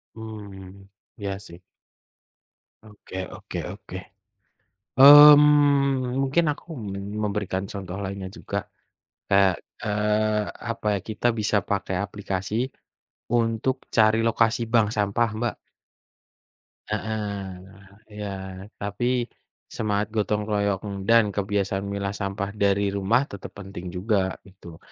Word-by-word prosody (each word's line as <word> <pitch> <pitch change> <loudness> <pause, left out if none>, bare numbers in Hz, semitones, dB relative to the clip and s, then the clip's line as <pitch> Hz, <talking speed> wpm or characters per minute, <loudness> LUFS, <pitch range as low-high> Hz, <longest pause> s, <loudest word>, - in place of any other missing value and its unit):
Hmm, 100 -3 -10 0.3
ya 100 -2 -4
sih. 85 -3 -12 1.2
Oke 105 -3 -13 0.2
oke - - -8
oke. - - -9 1.0
Mmm, 145 -2 +8
mungkin 145 +5 +2
aku - - -18 0.6
memberikan 100 -2 -2
contoh 95 -3 -6
lainnya 95 -1 -5
juga. - - -4 0.6
Kayak, 100 -2 +4 0.3
eee, 105 0 +1 0.3
apa 105 - -5
ya, - - -2
kita 110 +2 -1
bisa 105 -1 +1
pakai 95 -1 -2
aplikasi 100 +2 -2 0.7
untuk 120 +3 0
cari 110 0 +4
lokasi 115 0 +2
bank 115 -3 +3
sampah 105 +3 +1
Mbak. 120 +1 -1 1.3
Heeh 110 -1 -2 1.0
ya, 105 - -3 0.5
tapi 100 +4 -3 0.7
semangat 105 -1 0
gotong 105 -1 0
royong 100 -1 -1
dan 110 -4 +5
kebiasaan 100 -1 -1
memilah 100 0 -3
sampah 100 0 -3
dari 100 -1 +1
rumah 105 +7 +2
tetap 100 -7 -9
penting 95 -2 -8
juga 95 +1 -1
gitu. 85 -4 -13
105 Hz, 105 wpm, -25 LUFS, 100-115 Hz, 1.3 s, Mmm